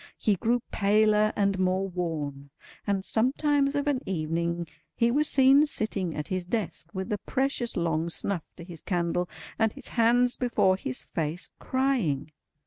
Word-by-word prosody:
He 210 - +2
grew 235 +5 0
paler 215 +1 +3
and 200 -2 +1
more 185 +1 +1
worn; 155 -6 -4 0.4
and 195 -1 0
sometimes 280 +4 +1
of 285 0 0
an 285 -3 0
evening 170 0 -1 0.3
he 235 0 +2
was 300 +4 +2
seen 275 +3 +5
sitting 195 - -2
at 150 0 -5
his 185 -1 -1
desk 185 -6 -3
with 190 +2 -3
a 205 - -2
precious 265 -1 -1
long 165 -1 0
snuff 175 +1 0 0.2
to 170 - -9
his 170 -2 -9
candle, 175 -1 -1 0.3
and 220 -1 +3
his - - -8
hands 245 +1 +3
before 235 -6 +2
his 130 -9 -5
face, 165 +2 -4
crying. 240 - 0
195 Hz, 155 wpm, -27 LUFS, 170-240 Hz, 0.4 s, seen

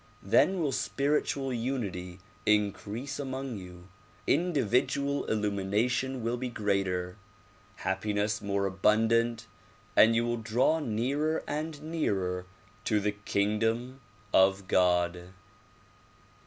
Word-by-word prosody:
Then 190 -2 +3
will 145 - +1
spiritual 135 +3 0
unity 105 -8 -3 0.3
increase 105 +6 0
among 135 -4 -4
you, 90 0 -12 0.4
individual 140 - +1
illumination 110 +5 0
will 120 +2 -1
be 125 0 -3
greater, 95 -4 -1 0.6
happiness 105 +2 -1
more 100 -1 0
abundant 115 +4 +2 0.5
and 115 +1 +6
you 115 +1 +2
will 120 0 -1
draw 115 +8 +2
nearer 140 +5 -1
and 155 0 -4
nearer 95 - -1 0.4
to 105 - +2
the 105 +1 0
kingdom 115 +5 -1 0.3
of 95 0 +4
God. 90 0 +1
110 Hz, 100 wpm, -29 LUFS, 100-130 Hz, 0.6 s, and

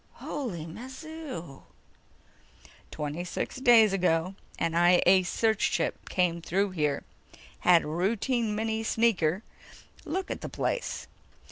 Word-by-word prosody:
"Holy 215 - -5
mazoo!" 260 - -8 1.3
"Twenty 150 +3 -4
six 180 - -4
days 235 -5 +6
ago 180 -1 +1 0.2
an 165 - -1
I 175 +1 +5
A 185 +1 +6
search 220 +4 0
ship - - -1
came 175 -2 +1
through 195 +4 0
here, 150 -5 -1 0.6
had 175 -2 +5
a - - -6
routine 210 - 0
mini 220 +1 -1
sneaker 215 -5 +1 0.6
look 365 +4 -3
at - - -5
the - - -5
place. - - -2
190 Hz, 120 wpm, -28 LUFS, 170-235 Hz, 1.3 s, days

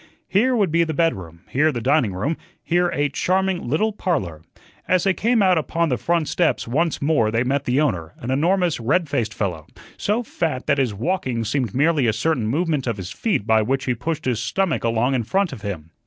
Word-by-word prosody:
Here 245 +7 +2
would 200 -8 +1
be 170 +1 +3
the 160 -2 -3
bedroom, 95 - -1
here 155 +4 +2
the 120 - -3
dining 130 -2 +2
room, 135 - -1 0.3
here 175 +1 +2
a 145 -2 0
charming 185 +1 0
little 215 - +1
parlor. 100 - -2 0.5
As 185 -2 +2
they 195 - +3
came 230 +2 +2
out 185 -3 +4
upon 165 +2 -1
the 125 - 0
front 170 0 0
steps 170 -8 0
once 155 +5 0
more 140 -8 +2
they 115 +2 +1
met 140 +2 -1
the 125 +3 +1
owner, 90 - -1
an 120 - -5
enormous, 170 +3 +1
red 150 +9 +1
faced 115 -6 -1
fellow, 90 -8 -3 0.3
so 215 +4 0
fat 160 - -3
that 140 - +2
his 130 -4 +1
walking 120 - -2
seemed 120 -2 -1
merely 145 -2 +3
a 110 - +2
certain 120 0 0
movement 150 +1 0
of 115 -3 -1
his 90 -2 -6
feet 210 - -1
by 110 -1 +4
which 130 +5 -1
he 125 - +1
pushed 155 +6 -4
his 125 -4 0
stomach 190 +7 -1
along 115 +3 +1
in 130 - +1
front 195 - 0
of - - -9
him. 85 -6 -6
140 Hz, 215 wpm, -22 LUFS, 115-170 Hz, 0.5 s, out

